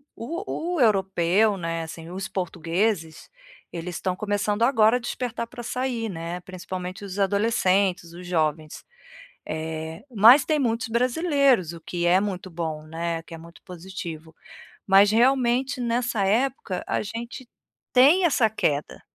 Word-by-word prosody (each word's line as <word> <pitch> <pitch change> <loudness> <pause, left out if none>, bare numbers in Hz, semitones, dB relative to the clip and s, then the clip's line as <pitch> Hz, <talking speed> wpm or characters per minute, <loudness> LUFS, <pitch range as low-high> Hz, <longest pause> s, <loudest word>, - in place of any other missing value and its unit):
o 340 - -4
o 315 - 0
europeu, 195 -1 +3
né, 165 -2 -3
assim, 165 0 -9
os 190 +1 -5
portugueses, 170 -1 -2 0.4
eles 175 +1 -5
estão 185 -1 -2
começando 205 +2 -1
agora 230 -2 +4
a - - -5
despertar 240 -1 -4
pra 240 - -9
açaí, 240 -1 -3
né, 170 -1 -5
principalmente 185 +1 -7
os 195 0 -6
adolescentes, 195 -3 +1
os 180 +1 -10
jovens. 155 -3 -1 0.6
Eh, 160 +1 -5
mas 230 +7 +8
tem 310 -1 +1
muitos 230 -2 -1
brasileiros, 255 - +2
o 170 - -10
que 175 +1 -3
é 180 +2 +5
muito 190 -2 -4
bom, 160 -2 -4
né, 165 +1 -3
o - - -18
que 165 - -11
é - - -8
muito 170 +1 -15
positivo. 170 -3 -8 0.5
Mas, 200 +1 +6
realmente, 255 +3 +2
nessa 235 -2 0
época, 220 -3 0
a - - 0
gente 230 +4 -7 0.5
tem 295 +9 +6
essa 250 -8 +3
queda, 150 -9 -2
195 Hz, 145 wpm, -24 LUFS, 170-235 Hz, 0.6 s, mas